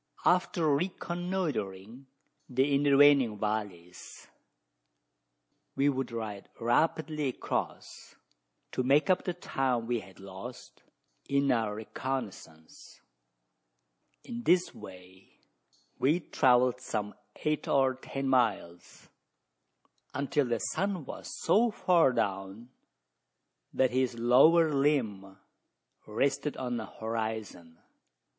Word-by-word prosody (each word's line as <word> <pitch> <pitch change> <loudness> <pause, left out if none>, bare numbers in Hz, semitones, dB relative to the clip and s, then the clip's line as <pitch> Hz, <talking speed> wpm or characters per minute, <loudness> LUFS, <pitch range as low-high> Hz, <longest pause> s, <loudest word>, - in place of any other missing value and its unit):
After 175 -2 +2
reconnoitring 145 - -3 0.4
the 135 +3 +1
intervening 140 -4 +5
valleys, 100 -5 -5 1.5
we 140 +1 +3
would 135 -2 -2
ride 110 -3 -6
rapidly 150 +5 +1
across, 130 - -5 0.6
to - - -1
make 140 +8 +3
up 185 - +1
the 180 - -2
time 130 -8 -1
we 120 0 -1
had 95 -2 -15
lost 100 +6 -10 0.5
in 140 0 +2
our 110 -3 0
reconnoissance. 110 -9 -7 1.2
In 240 0 -6
this 180 -5 +2
way 95 0 -14 0.7
we 145 +5 +3
had 175 - -8
travelled 125 0 +3
some 105 -4 -3 0.2
eight 155 -1 -2
or 135 -1 +3
ten 135 +1 -5
miles 110 -9 -1 1.1
until 140 +1 0
the 120 -1 0
sun 185 - -2
was - - -8 0.2
so 220 +8 +4
far 180 - +3
down, 100 0 -3 1.0
that 130 -2 +2
his 125 -1 0
lower 150 +7 +5
limb 110 -10 0 0.7
rested 135 +6 -1
on 125 -2 -3
the 110 -2 -5
horizon. 110 -7 -5
125 Hz, 100 wpm, -30 LUFS, 105-145 Hz, 1.5 s, intervening